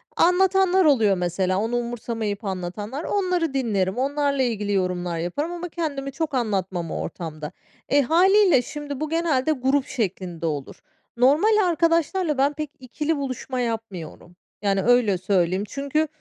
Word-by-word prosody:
Anlatanlar 380 +1 +4
oluyor 220 -10 +4
mesela, 180 +1 0
onu 225 +4 -1
umursamayıp 230 -3 -3
anlatanlar, 200 - -4
onları 360 -7 0
dinlerim, 210 -7 0
onlarla 280 +1 0
ilgili 210 -4 -1
yorumlar 180 -2 -1
yaparım 180 - -2
ama 350 0 -5
kendimi 285 -5 -3
çok 310 +1 -3
anlatmam 190 -8 -1
o - - -3
ortamda. 155 -3 -6 0.4
E, 285 - +4
hâliyle 360 - +5
şimdi 285 +1 -6
bu 310 - -2
genelde 315 -4 +1
grup 270 -1 +1
şeklinde 185 -7 -3
olur. 145 -4 -3 0.4
Normal 355 - +4
arkadaşlarla 335 -1 +1
ben 280 +2 +2
pek 305 -1 -5
ikili 295 +5 -2
buluşma 260 -1 -4
yapmıyorum, 205 -8 -5 0.3
yani, 195 -1 +1
öyle 235 -5 +3
söyleyeyim. 185 0 +1
Çünkü 280 +5 -1
255 Hz, 135 wpm, -23 LUFS, 195-310 Hz, 0.4 s, hâliyle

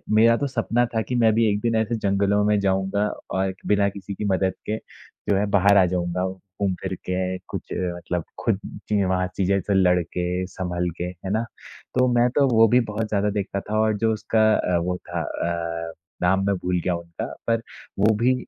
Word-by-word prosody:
मेरा 115 +1 +6
तो 140 - -1
सपना 120 -1 +1
था 110 - +2
कि 125 - -3
मैं 115 -2 +4
भी 115 0 +4
एक 100 0 0
दिन 115 -1 +1
ऐसे 110 +1 +1
जंगलों 100 0 +1
में 105 -1 +3
जाऊँगा 95 +1 +1 0.3
और 95 0 0
बिना 100 -1 +3
किसी 100 0 -7
की 105 - -4
मदद 95 -1 +1
के 110 +1 -1 0.5
जो 100 - +4
है 105 - +2
बाहर 100 +1 +5
आ 95 - +6
जाऊँगा 90 0 -1
घूम-फिर 95 0 -4
के 90 0 -1
कुछ - - -5
मतलब 90 -1 -3 0.2
खुद 105 -4 +1 0.3
ची 105 -1 +2
अ, 95 - +1
वहाँ 90 0 +1
चीज़ें 100 0 +2
से 100 - -1
लड़ 90 -2 +4
के, 90 +2 -2
संभल 90 -2 -2
के। 90 - -3
है 90 +1 -6
ना? 110 +2 +1 0.6
तो 125 - +5
मैं 120 +1 +4
तो 140 -2 +4
वो 115 0 +7
भी 125 +3 +4
बहुत 110 +1 -2
ज़्यादा 105 0 +1
देखता 100 -1 -2
था 110 0 +1
और 110 -1 +2
जो 110 +1 +2
उसका 110 0 +2
अ, 90 -1 +1
वो 90 0 -1
था 85 -1 -5
अ, 85 0 -3 0.3
नाम 95 +2 +2
मैं 100 - +2
भूल 90 0 -1
गया 90 -2 +1
उनका। 85 -1 -6 0.2
पर 115 0 +2 0.4
वो 110 +2 +5
भी 125 +2 +4
100 Hz, 210 wpm, -24 LUFS, 90-110 Hz, 0.6 s, वो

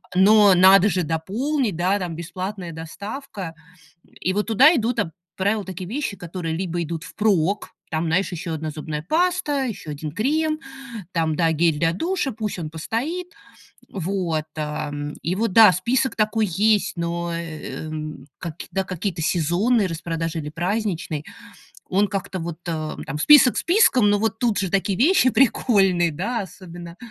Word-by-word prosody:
но 205 +1 +6
надо 190 +2 +7
же 180 -1 0
дополнить, 210 - -1
да, 185 +4 +1
там 175 -3 -4
бесплатная 180 +2 -5
доставка. 190 - -7 0.7
И 185 - 0
вот 210 +2 -1
туда 260 - +6
идут 240 -2 0
об 165 - -1 0.3
правило, 205 +2 +1
такие 185 -1 -7
вещи, 250 -4 -3
которые 170 -2 -4
либо 175 -1 -2
идут 165 0 -5
впрок, 200 -2 0 0.2
там, 160 +1 -1
знаешь, 180 +4 +1
еще 170 0 -4
1 155 0 -3
зубная 150 0 -5
паста, 315 - +1
еще 215 -9 -6
1 150 +1 -5
крем, 310 - 0 0.5
там, 160 -3 0
да, 165 -2 +2
гель 160 -1 +2
для 165 +1 +2
душа, 335 - -1
пусть 215 -3 -4
он 155 -3 -5
постоит. 260 - -3 0.6
Вот, 180 -4 -2
ам, 150 -1 -4
и 170 - -1
вот 225 -1 0
да, 215 -1 +8
список 240 +8 0
такой 215 0 +1
есть, 205 +2 +2
но, 170 0 -2
эм, 155 -3 -6
каки 170 -2 -7
да, 195 0 0
какие-то 185 -2 -3
сезонные 185 +8 +2
распродажи 165 0 -3
или 150 -1 -5
праздничный, 175 -3 -2 0.7
он 200 +2 +2
как-то 190 -1 -4
вот, 165 -1 -5
э, 155 -2 -3
там, 140 - -4
список 270 - +7
списком, 300 - +4
но 205 0 +3
вот 225 +1 -1
тут 225 -5 +1
же 190 -1 -1
такие 195 -1 +1
вещи 275 - +4
прикольные, 195 -9 +3
да, 210 +10 -2
особенно. 175 -3 -10
185 Hz, 155 wpm, -23 LUFS, 165-220 Hz, 0.7 s, да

